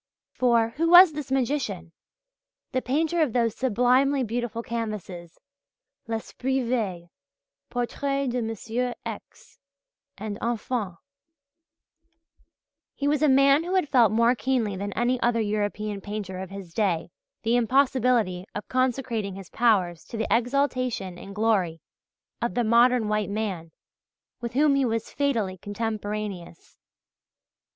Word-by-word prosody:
For, 235 -3 +3
who 330 +2 +2
was 350 -1 +9
this 295 -3 -6
magician, 240 - -1 0.8
the 255 -2 0
painter 320 +6 0
of 285 -8 +1
those 230 -3 +1
sublimely 260 +3 +2
beautiful 235 0 -3
canvases 205 -8 -5 0.7
"L'esprit 255 +4 -2
veille," 195 -8 -2 0.6
"Portrait 275 +3 -2
de 250 -1 -1
M. 230 +2 -3
X." - - -9 0.6
and 210 +1 -5
"Enfants." 230 -5 -2 2.0
He 285 - -2
was 295 0 +1
a 305 - +4
man 275 +3 +5
who 360 +2 -2
had 370 -5 +2
felt 240 -6 +4
more 230 +2 +4
keenly 245 -5 -1
than 200 +2 -4
any 245 +3 +1
other 240 -1 +2
European 210 -1 -2
painter 200 -2 -5
of 190 -1 -6
his 195 -4 -9
day 175 -5 0 0.3
the 230 +2 +2
impossibility 245 -6 +2
of 210 - -5
consecrating 250 -6 -1
his 195 -3 -10
powers 190 -8 +2
to 230 - -7
the 220 - -1
exaltation 245 -6 0
and 200 0 -10
glory 200 -7 +1 0.6
of 235 - -2
the 245 - +2
modern 235 0 +4
white 210 -1 0
man 200 -6 -3 0.7
with 235 0 -5
whom 290 +2 +4
he 275 0 +2
was 230 -2 -2
"fatally 225 -10 -1
contemporaneous." 205 -3 -5
230 Hz, 130 wpm, -26 LUFS, 205-255 Hz, 2.0 s, was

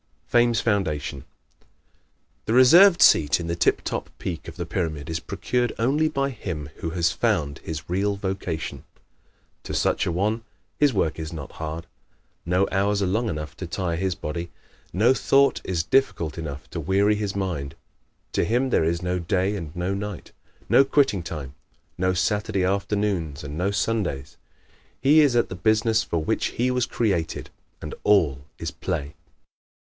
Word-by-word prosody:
Fame's 120 -2 +3
Foundation 80 - -1 0.4
¶ - - -34 0.8
The 110 - 0
reserved 170 +9 +7
seat 75 -1 +5
in 85 - -4
the 85 0 -2
tip 85 - +2
top - - -3
peak 85 -4 -5
of 80 - -8
the 85 -1 -4
pyramid 80 -3 -3
is 80 - -1
procured 125 +7 -1
only 145 +7 +2
by 140 -2 -1
him 80 - -6
who 80 - -4
has 85 0 +1
found 85 - 0
his 80 -2 -6
real 100 +3 0
vocation. 95 -5 -4 0.8
To - - -6
such - - +1
a - - +1
one 105 +6 0 0.4
his 145 -2 +5
work 85 -8 0
is 80 -1 -5
not 80 -4 -7
hard. 80 +1 -6 0.6
No 90 +3 +2
hours 100 +1 +1
are - - +2
long 110 +5 0
enough 75 -3 -5
to 95 - -5
tire 85 0 -2
his 95 +1 -1
body; 85 +2 -5 0.4
no 110 +8 +4
thought 140 +1 +3
is 85 -3 -1
difficult 85 - +1
enough 75 -3 -6
to 85 - -4
weary 100 +6 +2
his 105 -2 -2
mind; 85 -8 -3 0.6
to - - +1
him 125 +4 +1
there - - +3
is 85 +2 0
no 90 0 -1
day 95 +4 0
and 85 -6 -5
no 90 +2 -1
night, 100 -2 -5 0.4
no 135 - +6
quitting 135 -8 +2
time, 75 -5 -6 0.5
no 95 0 +1
Saturday 105 +2 0
afternoons 95 -6 -1
and 70 0 -6
no 90 +4 0
Sundays. 100 -9 -2 0.6
He 145 +4 +5
is 145 -5 +4
at 120 - +2
the 95 - -5
business 110 +3 +2
for 85 -6 -2
which - - 0
he 125 +2 +2
was 125 -1 0
created 95 -11 -1 0.3
and - - -5
all 75 -10 +3
is 80 -1 -4
play. 80 -5 -4
95 Hz, 170 wpm, -24 LUFS, 80-110 Hz, 0.8 s, reserved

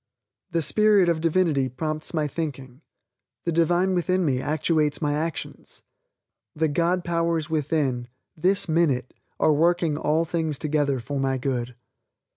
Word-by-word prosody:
The 165 -2 0
Spirit 205 +2 +4
of 165 -2 0
Divinity 160 -5 +2
prompts 155 +4 -4
my 155 -3 0
thinking. 135 -4 -6 0.6
The 170 - -1
Divine 175 +3 +2
within 185 +1 +1
me 130 -4 +1
actuates 155 0 0
my 150 -2 0
actions. 160 +2 -5 0.7
The 160 +1 +1
God 170 +4 0
Powers 165 -2 -1
within, 145 -5 0 0.3
this 185 +5 +2
minute 155 -7 +1 0.3
are 155 - +4
working 165 0 +2
all 155 +2 +1
things 160 -3 -2
together 145 -3 0
for 140 +4 -4
my 135 -1 0
good. 125 -2 -3
155 Hz, 135 wpm, -24 LUFS, 145-170 Hz, 0.7 s, Spirit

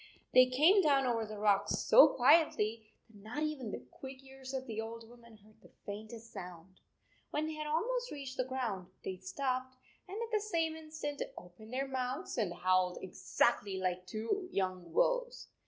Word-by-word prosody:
They 255 0 +8
came 310 +11 +5
down 280 -5 +4
over 230 -3 0
the 215 0 -7
rocks 205 -1 +2
so - - +8
quietly 240 -6 +3 0.2
that 215 -3 -17
not 245 +8 -3
even 295 -7 -2
the 125 -10 -6
quick 265 0 -10
ears 265 -1 -10
of 265 -1 -3
the 220 -3 -3
old 225 0 -7
woman 235 -1 -16
heard 215 +1 -23
the - - -17 0.2
faintest 220 +3 -8
sound. 180 +1 -9 0.5
When 300 +1 -1
they 315 - -3
had 305 0 -4
almost 485 +11 0
reached 275 -3 -6
the 255 - +2
ground, 245 -8 -3 0.2
they 190 - -4
stopped, 255 +7 -3 0.3
and 385 +2 -6
at 465 0 -4
the 430 - +3
same 330 -6 0
instant 310 -2 -6 0.2
opened 180 +6 -12
their 270 +2 -1
mouths 260 +5 -3
and 205 -6 0
howled 185 0 +2
exactly 195 +1 0
like 185 -1 -2
two 230 - -2
young 185 -3 -2
wolves - - +1
250 Hz, 175 wpm, -34 LUFS, 205-300 Hz, 0.5 s, They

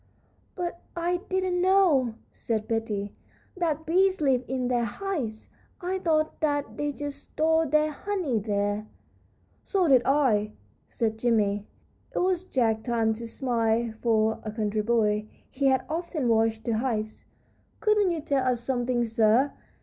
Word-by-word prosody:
"But 345 -1 -4
I 345 +1 0
didn't 370 -1 0
know," 350 - +4 0.2
said 220 -2 -2
Betty, 215 -3 -2 0.4
"that 320 -4 -1
bees 375 +3 +3
live 265 -4 +2
in 255 -1 -1
their 245 -1 +1
hives; 240 - -4 0.3
I 370 +1 -2
thought 315 -3 0
that 290 -2 -1
they 295 0 -1
just 290 0 -6
stored 320 0 +1
their 305 +1 +3
honey 340 - -1
there." 205 0 -1 0.8
"So 380 -4 +1
did 260 -4 +6
I," 235 -7 +2 0.3
said 220 -1 -2
Jimmie. 210 -4 +1 0.5
It - - -2
was 370 0 +1
Jack's 225 -8 +1
time 225 -2 +2
to 230 +1 -6
smile, 230 -2 0
for, 220 -1 +2
a 215 - -4
country 215 -1 -1
boy, 210 -1 +1 0.2
he 275 +1 +1
had 260 -1 +2
often 320 -4 -2
watched 225 -1 +2
the 225 -1 0
hives. 220 -4 -2 0.6
"Couldn't 420 -3 +3
you 335 -3 -2
tell 275 -3 0
us 250 -2 +1
something, 245 0 0
sir? 225 +4 +3
255 Hz, 145 wpm, -27 LUFS, 220-320 Hz, 0.8 s, did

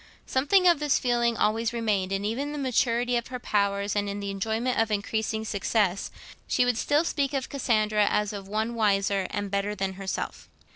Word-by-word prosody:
Something 360 +8 +3
of 340 -4 +5
this 295 -2 +2
feeling 240 -2 +1
always 225 +3 +1
remained; 210 -5 0
and 195 +1 -1
even 240 +7 -1
in - - -5
the - - -4
maturity 245 -2 +1
of 235 - -3
her 255 - -5
powers, 200 -3 0
and 205 0 0
in 200 0 -4
the 200 -1 -3
enjoyment 220 +5 -1
of 225 0 +2
increasing 220 +1 -1
success, 200 -2 0 0.4
she 250 - +2
would 245 -2 +1
still 295 +2 +2
speak 285 -4 -1
of 265 -1 -2
Cassandra 215 -6 +1
as 210 0 0
of 200 -1 -7
one 220 +3 -1
wiser 200 -3 +1
and 205 -1 -4
better 200 +1 -1
than 195 -1 -2
herself. 190 - -4
220 Hz, 195 wpm, -27 LUFS, 200-245 Hz, 0.4 s, of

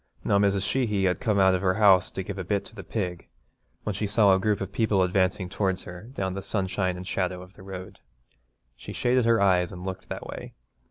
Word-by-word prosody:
Now 100 - +3
Mrs. 100 -1 +2
Sheehy 105 -4 0
had 90 -1 +1
come 110 -6 +1
out 95 -1 +5
of 90 - 0
her 95 -1 +2
house 95 -4 +5
to 95 - -5
give 100 +1 -6
a - - -2
bit 100 +2 -1
to - - -10
the 100 -3 -8
pig, 90 -6 -4 0.6
when 105 - -2
she 100 +2 -2
saw 100 -1 +5
a 95 - +3
group 105 +1 +1
of 95 0 -4
people 100 -2 +2
advancing 95 0 +1
towards 95 0 -1
her 90 +6 -10
down 95 -7 -2
the 100 - -4
sunshine 95 -2 -1
and 90 0 -8
shadow 90 -2 -2
of 90 +1 -16
the 100 - -15
road. 95 -1 -8 0.8
She - - -9
shaded 125 0 +2
her 115 -1 +4
eyes 90 -3 +3
and 90 -1 -8
looked 95 0 -6
that - - -5
way. - - -8
95 Hz, 230 wpm, -26 LUFS, 95-105 Hz, 0.8 s, out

